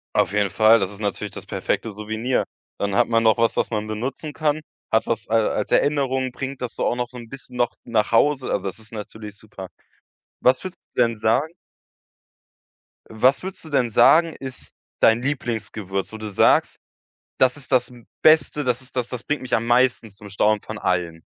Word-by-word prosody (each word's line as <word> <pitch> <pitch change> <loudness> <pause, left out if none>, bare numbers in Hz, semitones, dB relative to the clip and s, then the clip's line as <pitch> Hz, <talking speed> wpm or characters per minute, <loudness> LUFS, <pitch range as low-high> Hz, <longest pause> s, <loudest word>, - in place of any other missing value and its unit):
Auf - - +2
jeden 100 -1 +1
Fall, 110 +4 +5
das 95 -1 -2
ist 100 - -8
natürlich 100 -2 -3
das - - -9
perfekte 115 - -2
Souvenir. 110 +4 -2 0.3
Dann 100 -1 -2
hat - - +3
man 115 -1 +3
noch 110 0 +4
was, 115 0 +1
was - - +1
man 105 -2 -2
benutzen 125 +8 -4
kann. 155 0 -1 0.3
Hat 110 - +1
was 115 - -2
a 115 - +2
als 105 - -2
Erinnerung, 135 -3 +1
bringt 135 +1 -6
das 125 -2 -4
so - - -1
auch - - +1
noch 120 -1 -3
so 125 - -11
'n 120 -1 -9
bisschen 125 0 -10
noch 120 -1 +1
nach 115 -2 0
Hause, 135 +3 +3
also 100 - -1
das 95 +2 -4
ist 110 +1 -9
natürlich 105 -1 -8
super. 100 -3 -10 0.7
Was 130 +1 +3
würdest 185 -1 -7 0.2
du - - +3
denn 115 -2 +2
sagen 115 +8 +1 1.6
was 125 +7 +2
würdest 190 0 -6
du 160 - -8
denn 130 -5 +1
sagen, 160 +9 +5
ist 130 -1 -8 0.3
dein 115 +1 +4
Lieblingsgewürz, 110 -8 -3
wo 110 - -7
du 110 0 -6
sagst, 100 - +3 0.6
das 130 +1 +3
ist 140 -1 -10
das 125 -1 +3
m 120 -2 -16 0.2
Beste, 155 -1 +4
das 125 0 0
ist 130 - -11
das 125 -2 -1
das 120 -2 -6
bringt 150 - -2
mich 130 - -2
am 115 - 0
meisten 120 -2 +2
zum 100 +1 -11
Staunen 105 +2 +2
von 110 - -7
allen? 85 -4 -1
115 Hz, 200 wpm, -22 LUFS, 105-130 Hz, 1.6 s, Fall